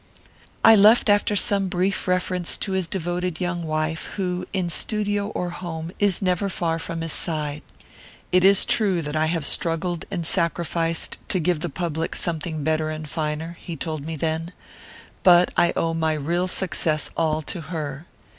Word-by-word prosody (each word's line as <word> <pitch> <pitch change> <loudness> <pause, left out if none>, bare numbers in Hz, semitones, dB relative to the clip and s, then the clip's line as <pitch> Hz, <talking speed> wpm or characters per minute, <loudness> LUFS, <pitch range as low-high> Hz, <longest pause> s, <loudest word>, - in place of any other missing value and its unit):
"I 225 - +9
left 215 +1 +6
after 205 0 +2
some 200 -2 +2
brief 185 +2 -1
reference 180 -1 0
to 195 - -2
his 190 -2 0
devoted 175 -1 -3
young 175 -1 -2
wife, 155 0 -3
who, 180 -2 -2
in 185 -3 -1
studio 205 +2 0
or 180 -4 -3
home, 170 -2 -6
is 200 -2 +3
never 185 +2 +1
far 165 -3 -1
from 165 0 -5
his 165 -1 0
side. 150 -2 -2 0.7
"'It 180 0 +4
is 195 0 +6
true 190 -6 +2
that 150 +1 -4
I 155 0 +2
have 165 -2 0
struggled 165 +2 -1
and 175 -4 -3
sacrificed 170 -1 0
to 185 - +1
give 175 -1 +1
the 175 +2 -3
public 165 0 -3
something 160 -2 -2
better 155 +1 0
and 155 0 -5
finer,' 155 +2 -3
he 170 - -6
told 155 -1 -4
me 160 +1 -4
then; 160 +3 -2 0.7
'but 180 -1 +5
I 170 - +4
owe 165 0 0
my 160 -1 0
real 170 +5 -1
success 165 -5 0
all 155 -1 0
to 175 +3 -4
her. 155 -1 -6
170 Hz, 170 wpm, -23 LUFS, 160-185 Hz, 0.7 s, I